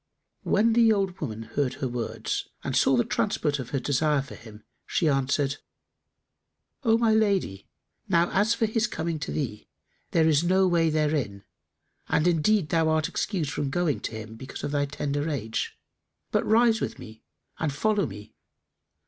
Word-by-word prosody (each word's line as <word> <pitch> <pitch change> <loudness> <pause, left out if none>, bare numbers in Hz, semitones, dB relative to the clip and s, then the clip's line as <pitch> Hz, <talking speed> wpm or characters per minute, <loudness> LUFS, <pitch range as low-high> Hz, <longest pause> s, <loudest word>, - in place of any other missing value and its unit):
When 225 +3 +2
the 230 -1 +5
old 195 -3 0
woman 115 -6 -4
heard 125 +4 -2
her 130 - -2
words 120 -2 -3 0.2
and - - -2
saw 135 - +4
the 120 - +2
transport 145 +5 0
of 125 -2 -6
her 140 - -1
desire 145 +1 +1
for 140 - -11
him, 110 -2 -13 0.2
she 165 - +1
answered, 140 0 +1 1.3
"O 225 -2 +4
my 230 -2 +3
lady, 200 - +1 0.4
now 170 -1 +3
as 210 +4 +2
for 225 - +1
his 225 +1 0
coming 165 -5 -3
to 155 - -4
thee, 110 -8 -4 0.4
there 160 -1 +3
is 155 0 +3
no 185 +2 +3
way 170 -2 +3
thereto; 150 -10 0 0.7
and 155 - +2
indeed 175 +1 +2
thou 160 -1 +2
art 155 -1 +2
excused 170 -9 -2
from 140 +1 -2
going 165 -1 0
to - - -5
him, 110 0 -7
because 130 +3 -8
of - - -2
thy 145 -1 +1
tender 145 +1 -2
age; 115 -7 -3 0.5
but - - +2
rise 225 0 +4
with - - -3
me 110 -1 -12 0.4
and 160 -2 0
follow 205 +6 +1
me. 105 0 -11
155 Hz, 170 wpm, -26 LUFS, 135-190 Hz, 1.3 s, the